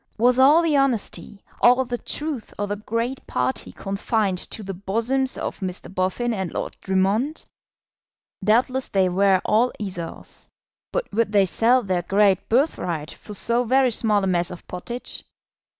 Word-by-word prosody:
Was 245 +3 +4
all 295 +6 +6
the 320 -3 +2
honesty, 245 -6 -1 0.2
all 250 +2 +5
the 245 -1 -4
truth 290 -7 -4
of 205 0 -2
the 205 - -1
great 230 +5 -3
party 260 - -1
confined 195 -1 -1
to 215 - -6
the 195 0 -5
bosoms 230 +8 -1
of - - -4
Mr. 185 -1 -5
Boffin 190 +6 0
and 190 -5 -3
Lord - - -4
Drummond? 200 +10 0 1.0
Doubtless 250 +5 +2
they 190 -2 +2
were 190 +1 +3
all 230 +4 +3
Esaus; 180 -5 -7 0.4
but - - -2
would 220 0 +1
they 200 -2 +4
sell 240 +7 +3
their 185 -3 0
great 195 +2 +2
birthright 180 - 0
for 210 - -9
so 235 +4 +1
very 255 +1 +3
small 215 -3 +1
a - - +1
mess 175 -2 +1
of 180 - -10
pottage? 235 +7 -6
215 Hz, 155 wpm, -23 LUFS, 190-250 Hz, 1.0 s, all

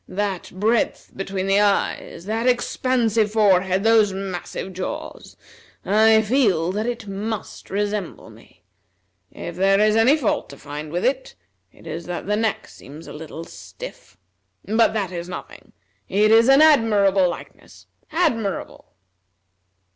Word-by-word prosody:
That 195 -1 -3
breadth 215 +5 0
between 195 0 -3
the 195 +1 +3
eyes, 200 -3 0
that 225 +4 -1
expansive 240 -3 +1
forehead, 190 -3 +3
those 220 -2 +4
massive 190 0 -5
jaws! 185 +1 -7 0.5
I 220 +2 +4
feel 205 -8 +2
that 215 +4 -2
it 240 -2 -4
must 205 +2 -6
resemble 205 -2 -3
me. - - -20 0.7
If - - -8
there 195 +1 +3
is 215 0 +3
any 240 +7 +5
fault 260 -8 -1
to 140 - -11
find 150 +2 -8
with 175 +2 -2
it, 260 +1 -1 0.4
it - - -20
is 170 - -6
that 175 -1 -5
the 210 +2 0
neck 220 0 -1
seems 150 +4 -13
a - - -10
little 160 +1 -8
stiff. - - -11 0.5
But 220 +2 +2
that 200 -5 -2
is 175 0 -6
nothing. 180 - -9 0.4
It 210 +2 +3
is 230 +3 +6
an 275 +3 +7
admirable 205 - +4
likeness, 175 - -10 0.3
admirable!" 240 - -2
205 Hz, 140 wpm, -22 LUFS, 185-225 Hz, 0.7 s, an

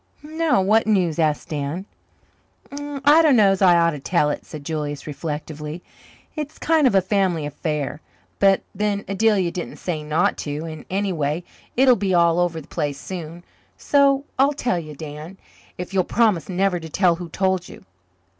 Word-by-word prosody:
"No, 315 -7 +1
what 215 +4 +3
is 180 -6 +1
it?" - - +4
asked 155 -2 0
Dan. 150 +5 -3 0.9
"I 290 +2 +3
dunno's 215 - +4
I 180 -2 +6
ought 170 0 +3
to 150 - -6
tell 150 0 +1
it," - - -6
said 150 -3 -9
Julius 145 -3 -4
reflectively. 150 +1 -6 0.5
"It's 300 -1 -5
kind 315 -3 +3
of 210 - +1
a 190 - +4
family 185 -5 0
affair, 150 0 -3 0.4
but 195 -1 +4
then 205 -1 -1
Adelia 195 -3 +2
didn't 175 - -6
say 165 -4 -3
not 150 +1 +1
to, 150 +2 -4
and 155 -1 -8
anyway 175 -5 -1 0.3
it'll 255 -1 +6
be 190 -3 0
all 170 0 +4
over 175 -2 0
the 155 - -13
place 145 -5 -3
soon. 170 -1 -7 0.3
So 280 -1 +3
I'll 280 +2 +4
tell 240 -10 -1
you, 155 -2 -9
Dan, 155 +4 -8 0.4
if 180 +2 -6
you'll 190 -1 +3
promise 210 -6 +1
never 185 0 +1
to 160 -1 -9
tell 175 0 +2
who 175 -1 -7
told 190 +1 -1
you. - - -13
180 Hz, 170 wpm, -22 LUFS, 155-205 Hz, 0.9 s, I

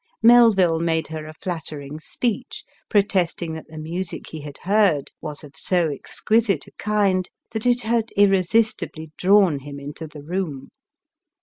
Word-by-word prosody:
Melville 220 -8 +6
made 165 -1 0
her 155 -1 -6
a 155 - -9
flattering 155 -4 -6
speech, 225 - -3 0.3
protesting 180 -5 +1
that 160 - -8
the 160 - -11
music 165 +3 -5
he 160 - -7
had 145 -1 -9
heard 195 -7 +2
was 150 -2 -6
of 145 +1 -13
so 175 0 +1
ex 140 - -8
quisite 220 -2 +2
a - - -16
kind, 200 -3 +1 0.2
that 220 +1 -1
it 245 0 +3
had 230 0 +1
irresistibly 195 -4 +2
drawn 190 -6 +4
him 140 +1 -9
into 145 +3 -7
the 150 -1 -11
room. 160 -4 -4
175 Hz, 150 wpm, -23 LUFS, 155-205 Hz, 0.3 s, Melville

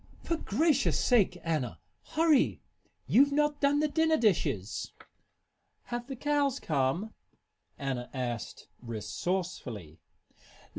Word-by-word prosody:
"For 335 - 0
gracious 290 +3 +2
sake, 210 -7 +3
Anna! 135 - -2 0.3
Hurry! 315 -3 +3 0.4
You've 280 +4 +5
not 295 0 +1
done 285 +1 +3
the 305 - +3
dinner 320 +1 +2
dishes!" 155 - 0 0.9
"Have 240 0 -5
the 270 - -5
cows 285 0 +1
come?" 155 +9 0 0.6
Anna 130 -3 -3
asked, 120 -4 -4
resourcefully. 115 - -4
210 Hz, 100 wpm, -30 LUFS, -, 0.9 s, You've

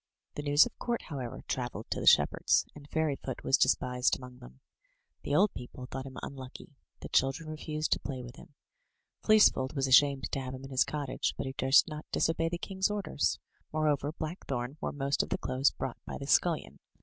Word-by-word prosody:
The - - -4
news 145 +1 +5
of - - -8
court, 240 -1 -2
however, 130 -6 -5
travelled 120 -4 -4
to - - -1
the - - -3
shepherds, - - +5
and 145 -1 -13
Fairyfoot 145 -5 -2
was 135 - +4
despised 125 -1 +2
among 125 -1 -12
them. 60 +1 -14 0.6
The 145 - -1
old 200 +5 +4
people 125 0 -8
thought 135 +1 -6
him 130 - -10
unlucky; 130 0 -9 0.3
the - - -7
chil 135 +1 +3
dren 155 +4 -9
refused 155 0 -3
to - - +3
play 130 -3 -5
with 120 +1 -10
him. 140 - -15 0.7
Fleecefold 205 -11 +4
was 135 -1 +1
ashamed 135 0 +4
to - - -1
have 130 0 -5
him 130 - -10
in 135 - -9
his 130 - +3
cottage, 145 -3 -2
but - - -3
he 130 - -4
durst 135 +3 +5
not 150 -1 -7
disobey 165 0 +1
the 175 - -3
king's 190 +2 -1
orders. 205 -8 -1 0.3
Moreover, 150 -2 +1
Blackthorn 145 -6 -4
wore - - -2
most 140 0 0
of - - -5
the - - 0
clothes 130 +2 +1
brought 130 -2 -5
by - - -5
the 140 - -6
scullion. 165 +3 +1
140 Hz, 200 wpm, -30 LUFS, 130-155 Hz, 0.7 s, news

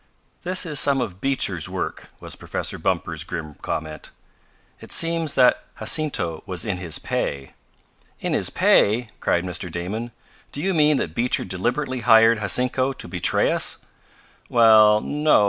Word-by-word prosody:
"This 185 0 +1
is 150 -4 +1
some 140 -1 +3
of 95 -6 -5
Beecher's 100 - 0
work," - - -5
was - - -7
Professor - - -5
Bumper's - - -2
grim 80 -2 -6
comment. 75 0 -5 0.7
"It - - -13
seems 165 -2 0
that 125 -1 +4
Jacinto 100 - -1
was 90 +2 0
in 100 -4 -2
his 90 -3 -2
pay." 70 -1 -4 0.7
"In - - -2
his - - +1
pay!" 110 +3 +3
cried 85 - 0
Mr. 90 -1 -3
Damon. 100 +8 -4 0.4
"Do - - -2
you 190 +5 -1
mean 150 -3 +3
that 80 - -3
Beecher 120 +7 0
deliberately 125 +8 -2
hired 115 -1 +5
Jacinto 125 +6 0
to 130 - -8
betray 90 -1 +2
us?" - - 0 0.7
"Well, 110 -2 +6
no. 150 +1 +2
115 Hz, 145 wpm, -22 LUFS, 90-140 Hz, 0.7 s, Well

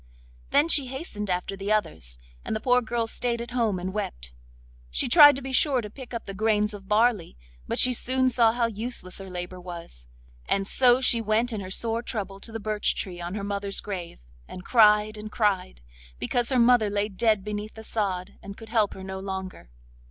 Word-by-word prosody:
Then 290 +3 +4
she 285 -5 +4
hastened 250 - -6
after 180 +2 -2
the 195 +2 -4
others, 70 - -1 0.3
and - - -3
the - - -1
poor 250 +2 +3
girl 235 0 -1
stayed 235 +1 -2
at 235 +1 -6
home 230 -6 0
and 185 +1 -4
wept. 60 - -5 0.6
She - - -1
tried 290 0 +9
to 275 - -7
be 265 - -5
sure 265 0 +3
to 210 -3 -6
pick 260 +1 -11
up 235 -2 -5
the 195 - -6
grains 210 +1 +1
of 195 -2 -10
barley, 210 - +1 0.3
but - - -2
she 250 - +5
soon 260 +2 +1
saw 235 -2 +4
how 235 0 0
useless 225 -4 -4
her 195 0 -9
labour 180 0 -6
was; 170 - -9 0.4
and 195 0 0
so 250 +2 +4
she 235 -3 +3
went 225 +2 +1
in 210 - -3
her 185 - -7
sore 225 +4 -1
trouble 200 -5 -5
to 225 - -10
the 225 - -5
birch 215 -1 -1
tree 175 -2 -5
on 175 +3 -5
her 205 - -4
mother's 200 0 -2
grave, 185 -5 -6 0.3
and 180 - -10
cried 215 -2 +4
and 215 0 -8
cried, 190 - 0 0.4
because 240 - -1
her 260 - +1
mother 240 -3 +5
lay 205 0 0
dead 215 0 +1
beneath 210 +1 -5
the 220 - -10
sod 195 -5 -3
and 200 0 -9
could 225 -1 -12
help 220 -3 +1
her 190 - -9
no 190 0 -6
longer. 190 - -6
210 Hz, 210 wpm, -26 LUFS, 190-235 Hz, 0.6 s, tried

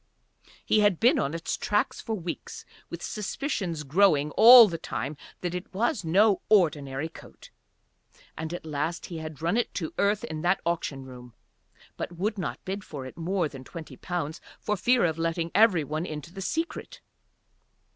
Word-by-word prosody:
He 215 - +3
had 205 -5 +3
been 260 +6 +4
on 145 +4 -1
its 165 - -3
tracks 210 0 -1
for 225 - -3
weeks 175 -4 -6 0.2
with 170 0 -7
suspicions 205 - -3
growing 150 -1 +3
all 235 - +10
the 165 -4 -4
time 135 +7 -4 0.3
that 180 -1 -3
it 180 +1 -6
was 220 -1 0
no 195 +5 +3
ordinary 150 -7 +2
coat, 165 - -15 0.8
and 160 0 -5
at 175 - -6
last 155 +2 -3
he 170 -3 -6
had 155 -1 -8
run 170 +7 +1
it 240 - 0
to 165 -4 -3
earth 205 +1 +2
in 155 -1 -5
that 180 +3 +2
auction 160 -5 -2
room 125 -2 -12 0.6
but - - -5
would 205 +3 -1
not 135 -8 -5
bid 195 +1 -4
for 140 -7 -8
it 130 - -9
more 175 +1 -1
than 135 -3 -10
twenty 160 +4 -9
pounds 175 -3 -4 0.2
for 210 - -1
fear 235 +3 +3
of 160 -1 -1
letting 165 0 -1
every 205 -7 +5
one 155 +5 -3
into 155 +2 -7
the 195 - -7
secret. 330 - -4
170 Hz, 175 wpm, -27 LUFS, 155-205 Hz, 0.8 s, all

